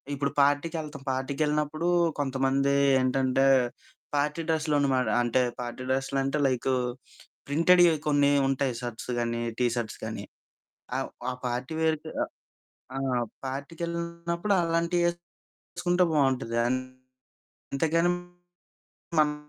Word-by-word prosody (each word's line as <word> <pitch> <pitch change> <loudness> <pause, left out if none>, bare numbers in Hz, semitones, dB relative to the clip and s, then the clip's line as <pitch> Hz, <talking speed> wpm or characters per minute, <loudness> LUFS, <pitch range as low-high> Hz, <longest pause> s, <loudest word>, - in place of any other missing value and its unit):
ఇప్పుడు 140 0 -1
పార్టీకెళ్తాం. 150 0 0
పార్టీకెళ్ళినప్పుడు 150 +4 -1 0.3
కొంతమంది 135 0 +1 0.3
ఏంటంటే 130 +1 +2 0.7
పార్టీ 150 +3 0
డ్రెస్సులన్నమాట. 145 -5 +2
అంటే 120 +2 +2 0.2
పార్టీ 120 +1 -5
డ్రెస్సులంటే 135 +2 0
లైకు 130 +1 0 0.7
ప్రింటెడ్‌యి 170 +3 +5
కొన్ని 145 -1 +4 0.2
ఉంటాయి 135 -2 0
షర్ట్స్ 120 0 -5
గానీ, 115 0 -1 0.2
టీ 125 - +3
షర్ట్స్ 110 -3 -4
కానీ. - - -5 0.7
ఆహ్, 135 - -2 0.2
ఆ - - -2 0.2
పార్టీ 125 +4 -3
వేర్‌కి 160 0 0
ఆ - - -7 0.7
ఆ! 135 -2 0 0.3
పార్టీకెళ్ళినప్పుడు 170 +5 -2
అలాంటియేసుకుంటే 170 +1 0 0.8
బావుంటది. 130 -4 +1
అంతేగాని 130 0 -6 1.9
మనం 150 -1 +2
140 Hz, 90 wpm, -27 LUFS, 130-160 Hz, 1.9 s, ప్రింటెడ్‌యి